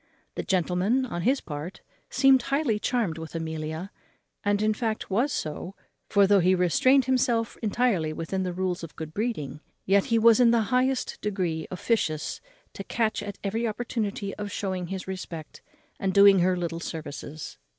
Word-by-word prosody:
The -, -, -3 dB
gentleman, 190 Hz, +7 st, +1 dB
on 175 Hz, -8 st, -4 dB
his 260 Hz, +9 st, +2 dB
part, 150 Hz, +4 st, -7 dB, 0.3 s
seemed 270 Hz, -1 st, +5 dB
highly 275 Hz, -4 st, 0 dB
charmed 210 Hz, -10 st, -1 dB
with 160 Hz, +1 st, -8 dB
Amelia, 160 Hz, +2 st, -4 dB, 0.5 s
and 205 Hz, 0 st, +2 dB
in 215 Hz, 0 st, +3 dB
fact 220 Hz, -2 st, -3 dB
was 245 Hz, +9 st, +2 dB
so, 175 Hz, +3 st, -4 dB, 0.3 s
for, 200 Hz, -1 st, +5 dB
though 200 Hz, 0 st, +5 dB
he 185 Hz, +1 st, +4 dB
restrained 250 Hz, -, +4 dB
himself 240 Hz, -3 st, +1 dB
entirely 215 Hz, -7 st, +1 dB
within 165 Hz, +4 st, -3 dB
the 185 Hz, -1 st, -1 dB
rules 180 Hz, -1 st, -2 dB
of 165 Hz, -, -8 dB
good 155 Hz, -1 st, -7 dB
breeding, 155 Hz, -, -3 dB, 0.3 s
yet 200 Hz, +3 st, +2 dB
was 230 Hz, -1 st, +6 dB
he -, -, +5 dB
in 240 Hz, -, +6 dB
the 235 Hz, -1 st, +4 dB
highest 255 Hz, +1 st, +1 dB
degree 180 Hz, -6 st, -2 dB
officious 180 Hz, -6 st, -1 dB, 0.3 s
to -, -, -6 dB
catch 220 Hz, -3 st, -1 dB
at 205 Hz, -1 st, -6 dB
every 225 Hz, +4 st, -1 dB
opportunity 215 Hz, -3 st, -3 dB
of 205 Hz, -1 st, -5 dB
shewing 185 Hz, -3 st, -3 dB
his 190 Hz, +1 st, -5 dB
respect, 175 Hz, -4 st, -7 dB, 0.4 s
and 190 Hz, 0 st, -1 dB
doing 200 Hz, -1 st, +8 dB
her 180 Hz, +1 st, +2 dB
little 170 Hz, -1 st, -3 dB
services. 155 Hz, -2 st, -7 dB
195 Hz, 165 wpm, -26 LUFS, 170-230 Hz, 0.5 s, doing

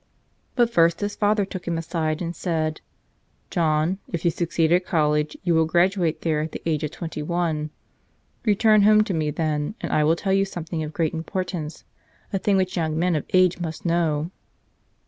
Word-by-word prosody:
But 240 Hz, -2 st, +3 dB
first 170 Hz, -2 st, +3 dB
his 205 Hz, 0 st, -2 dB
father 210 Hz, -1 st, +2 dB
took 185 Hz, -2 st, -8 dB
him 170 Hz, -1 st, 0 dB
aside 160 Hz, 0 st, -2 dB
and 170 Hz, 0 st, -4 dB
said: 155 Hz, -3 st, -2 dB, 0.7 s
''John, 160 Hz, +2 st, +1 dB
if 170 Hz, 0 st, -3 dB
you 170 Hz, -, +4 dB
succeed 165 Hz, -1 st, 0 dB
at 180 Hz, +1 st, +4 dB
college 150 Hz, -3 st, +1 dB
you 175 Hz, -2 st, +2 dB
will 160 Hz, -1 st, +3 dB
graduate 175 Hz, 0 st, +2 dB
there 155 Hz, -2 st, 0 dB
at 155 Hz, +1 st, -5 dB
the -, -, -6 dB
age 155 Hz, -2 st, 0 dB
of 150 Hz, -, -1 dB
twenty 160 Hz, -1 st, -6 dB
one. 160 Hz, -1 st, -1 dB, 0.7 s
Return 215 Hz, -1 st, +4 dB
home 215 Hz, +1 st, +6 dB
to 210 Hz, -3 st, -3 dB
me 155 Hz, -2 st, 0 dB
then 150 Hz, +3 st, -2 dB
and -, -, -4 dB
I 150 Hz, -, +3 dB
will 160 Hz, +2 st, +3 dB
tell 190 Hz, +3 st, -1 dB
you 195 Hz, 0 st, +4 dB
something 170 Hz, -4 st, -5 dB
of 155 Hz, -1 st, -4 dB
great 160 Hz, -1 st, -1 dB
importance, 165 Hz, -2 st, -4 dB, 0.5 s
a 195 Hz, -, +1 dB
thing 200 Hz, -1 st, +2 dB
which 185 Hz, -1 st, 0 dB
young 160 Hz, -2 st, 0 dB
men 175 Hz, +2 st, +2 dB
of 150 Hz, -, -2 dB
age 185 Hz, -1 st, +4 dB
must 165 Hz, -1 st, -5 dB
know." 165 Hz, -1 st, 0 dB
170 Hz, 190 wpm, -24 LUFS, 155-185 Hz, 0.7 s, home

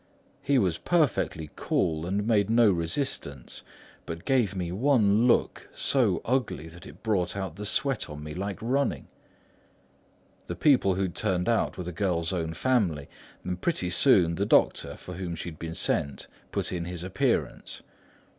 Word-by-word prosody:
He 140 Hz, 0 st, +2 dB
was 90 Hz, -8 st, +1 dB
perfectly 140 Hz, -, 0 dB
cool 80 Hz, +1 st, 0 dB
and 100 Hz, +3 st, -1 dB
made 105 Hz, -3 st, +2 dB
no 115 Hz, -2 st, +5 dB
resistance, 85 Hz, -, -2 dB, 0.5 s
but 85 Hz, 0 st, -6 dB
gave 120 Hz, -7 st, +2 dB
me 90 Hz, -2 st, -3 dB
one 110 Hz, 0 st, +3 dB
look, -, -, +1 dB
so 115 Hz, -11 st, +1 dB
ugly 125 Hz, -, -1 dB
that 85 Hz, +3 st, -12 dB
it -, -, -14 dB
brought 100 Hz, -4 st, 0 dB
out 95 Hz, -5 st, -4 dB
the 105 Hz, +2 st, -4 dB
sweat 135 Hz, -4 st, 0 dB
on 75 Hz, 0 st, -8 dB
me 75 Hz, 0 st, -6 dB
like 100 Hz, +3 st, -4 dB
running. 135 Hz, +4 st, 0 dB, 1.4 s
The -, -, -4 dB
people 125 Hz, -10 st, +4 dB
who 95 Hz, -, 0 dB
had 90 Hz, -3 st, -2 dB
turned 95 Hz, -4 st, 0 dB
out 115 Hz, -1 st, +1 dB
were 90 Hz, -, -4 dB
the 90 Hz, -, -5 dB
girl's 85 Hz, -2 st, -1 dB
own 80 Hz, -2 st, -2 dB
family; 95 Hz, -, 0 dB, 0.3 s
and 90 Hz, 0 st, -4 dB
pretty 95 Hz, -, -1 dB
soon, 90 Hz, -4 st, +4 dB
the 100 Hz, +4 st, -1 dB
doctor, -, -, +2 dB
for 90 Hz, -, -9 dB
whom 90 Hz, -1 st, -4 dB
she 85 Hz, -, -5 dB
had 80 Hz, -, -12 dB
been 80 Hz, 0 st, -5 dB
sent 70 Hz, -4 st, -1 dB, 0.3 s
put -, -, -2 dB
in 85 Hz, -1 st, -3 dB
his 90 Hz, -1 st, -5 dB
appearance. 95 Hz, -, -1 dB
95 Hz, 165 wpm, -27 LUFS, 85-115 Hz, 1.4 s, no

